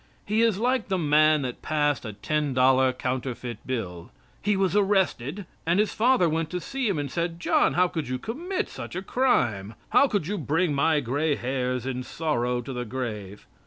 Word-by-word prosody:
He 215 +2 +1
is 225 -4 +3
like 250 +1 +1
the 190 - 0
man 155 -2 +4
that 125 -2 -5
passed 145 -4 0
a 110 - -5
ten 150 +6 -1
dollar 130 0 +4
counterfeit 125 -2 -4
bill. 90 -9 -4 0.3
He 205 -1 +1
was 190 0 +1
arrested 195 -4 +1 0.2
and 170 +4 +2
his 210 - +1
father 240 -5 +3
went 160 0 -1
to 180 - -3
see 270 +6 -3
him 195 -6 0
and 145 -2 -3
said, 170 +1 -2
"John, - - +2
how 180 +1 +4
could 160 -5 -4
you 130 0 -2
commit 340 - -3
such - - -8
a 185 - -3
crime? 115 - +1
How 280 - +5
could 205 - -1
you 200 +3 -2
bring 160 +3 +1
my 150 +2 +2
gray 145 +4 0
hairs 125 -1 -2
in 130 -1 -3
sorrow 125 -3 -1
to 130 +3 -7
the 125 0 -3
grave?" 105 -5 -5
150 Hz, 195 wpm, -26 LUFS, 125-190 Hz, 0.3 s, How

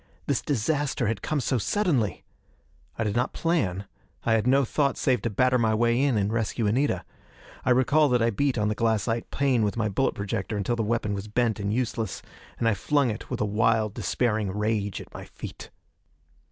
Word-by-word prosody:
This - - 0
disaster 140 +1 0
had 115 -1 -1
come 155 - -1
so 130 -1 0
suddenly! 145 - 0 0.7
I 115 - 0
did 105 -2 -1
not 120 - 0
plan; 100 - 0 0.4
I 115 - +2
had 115 +1 +2
no 135 +1 +4
thought 140 +2 0
save 130 -2 +1
to 115 - -1
batter 125 +4 +2
my 110 -1 +2
way 120 +2 +2
in 140 -5 +2
and 105 +1 0
rescue 115 0 -1
Anita. 125 +8 +1 0.6
I - - 0
recall 130 +4 +4
that 125 -1 +3
I 115 - +2
beat 135 +4 0
on 105 -1 +1
the 105 - +1
glassite 115 +1 0
pane 135 -4 +1
with 105 +1 0
my 110 -2 0
bullet 120 +7 0
projector 100 +1 -3
until 105 +4 0
the 115 - -1
weapon 110 -1 -1
was 100 +1 -4
bent 115 0 0
and 100 0 -1
useless; 115 -1 -2 0.3
and 115 - 0
I 115 - +4
flung 140 +3 +1
it 110 - -7
with - - -3
a - - +2
wild, 105 0 +1
despairing 110 -5 0
rage 105 0 -1
at - - -14
my - - -8
feet. - - -9
115 Hz, 200 wpm, -26 LUFS, 105-130 Hz, 0.7 s, no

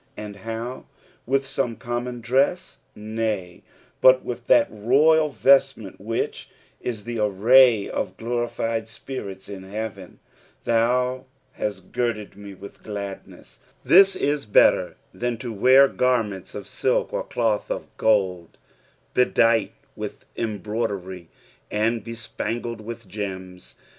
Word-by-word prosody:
And 105 -1 -7
how! 115 +5 -6 0.4
With 135 +1 +1
some 125 -3 -2
common 120 0 -4
dress) 135 +9 0 0.2
Nay, 105 -4 -3 0.4
but 130 0 +6
with 125 0 -6
that - - +5
royal 150 +9 +3
vestment 135 -8 +2
which 115 +3 -3 0.3
is 110 -4 -5
the 120 -1 -4
array 110 +2 +5
of - - -4
glorified 115 -1 -2
spirits 105 -5 -8
in 100 -2 -8
heaven. 100 -1 -7 0.2
" - - -32
Thau 125 +3 +1 0.3
htut 100 -3 -4
girded 115 -5 -2
me 100 -1 -10
with 100 +2 -12
gtadaeu." 100 -2 -8 0.3
This 195 +1 +7
is 145 -7 -1
better 105 - +4 0.2
than 120 -1 -2
to 120 -1 -6
wear 130 +6 +6
gannents 115 -8 -1
of - - -5
utk - - -1
or - - -1
cloth 110 -3 -1
of - - -5
gold, 95 -6 +1 0.6
bedight 115 -3 +3 0.2
with - - -7
embroidery 100 -5 -4 0.4
and 110 +1 0
bespangled 115 0 -5
with 115 0 -8
gems. 95 -2 -7
115 Hz, 120 wpm, -24 LUFS, 100-125 Hz, 0.6 s, This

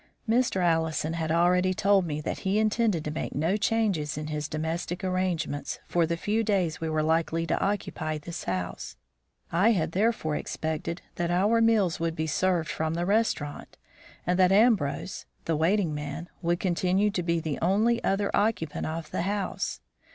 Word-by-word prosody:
Mr. 225 -5 +2
Allison 160 -1 +1
had 160 -1 -2
already 180 +2 +3
told 195 -2 +3
me 150 -1 -2
that - - -3
he 195 +1 0
intended 215 -5 +1
to 150 - -2
make 155 - -4
no 165 +7 +1
changes 205 -9 0
in 150 0 -4
his 150 -1 -3
domestic 165 +4 -3
arrangements 180 -6 -1
for 170 -2 +1
the 170 0 -1
few 215 +6 0
days 185 -8 0
we 160 - -1
were 155 -1 +1
likely 165 +1 +1
to - - 0
occupy 175 -6 -2
this 165 +3 -7
house. 90 -8 -4 0.6
I 200 +8 +4
had 170 -5 0
therefore 195 -5 +1
expected 160 +2 -4
that 170 -1 0
our 205 +6 +3
meals 215 -7 +3
would 165 -1 -1
be 160 - -1
served 170 0 +1
from 160 +1 -2
the 170 +1 -1
restaurant, 200 -8 -1 0.5
and 180 +1 +1
that 185 0 +5
Ambrose 195 - +2 0.2
(the 165 - +1
waiting 170 +1 +2
man) 150 +3 -5
would 170 0 +1
continue 185 +3 +1
to 185 - -1
be 170 -1 0
the 155 -3 -3
only 215 +7 +2
other 200 +1 +1
occupant 205 -8 0
of 160 0 -5
the - - -1
house. 200 +2 -2
170 Hz, 175 wpm, -27 LUFS, 160-200 Hz, 0.6 s, that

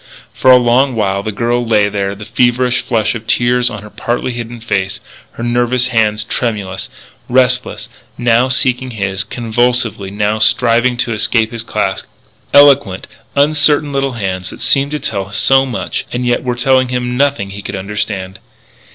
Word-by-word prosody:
For 130 - +2
a 130 - +9
long 125 +2 +2
while 100 -3 0
the 110 - -4
girl 120 +3 -1
lay 110 -3 +2
there, 100 -1 -2
the 105 +1 -10
feverish 125 +2 +1
flush 115 -3 0
of 115 -1 -8
tears 125 0 +2
on 105 -3 -8
her 105 - -11
partly 120 +1 -2
hidden 120 0 -7
face, 95 -4 -2 0.3
her 120 - -7
nervous 120 +1 +1
hands 110 -3 +1
tremulous, 100 -5 -3 0.4
restless, 125 0 +1 0.3
now 120 +1 +3
seeking 130 0 0
his, 100 -4 -2
convulsively, 120 -3 -1
now 105 +2 -1
striving 120 +2 +2
to 120 -1 -1
escape 110 +1 0
his 115 -1 -5
clasp 115 - -2 0.5
eloquent, 140 -9 +5 0.3
uncertain 145 0 +3
little 135 -1 -1
hands 95 -5 -3
that - - -11
seemed 140 +1 +2
to 150 0 -3
tell 100 -6 -4
so 135 +5 +3
much 120 - -4
and 125 0 -2
yet 120 0 +1
were 125 -1 -1
telling 130 +1 +2
him 125 0 -2
nothing 140 -7 0
he 100 +1 -7
could 100 - -6
understand. 95 -1 -4
120 Hz, 165 wpm, -14 LUFS, 105-125 Hz, 0.5 s, a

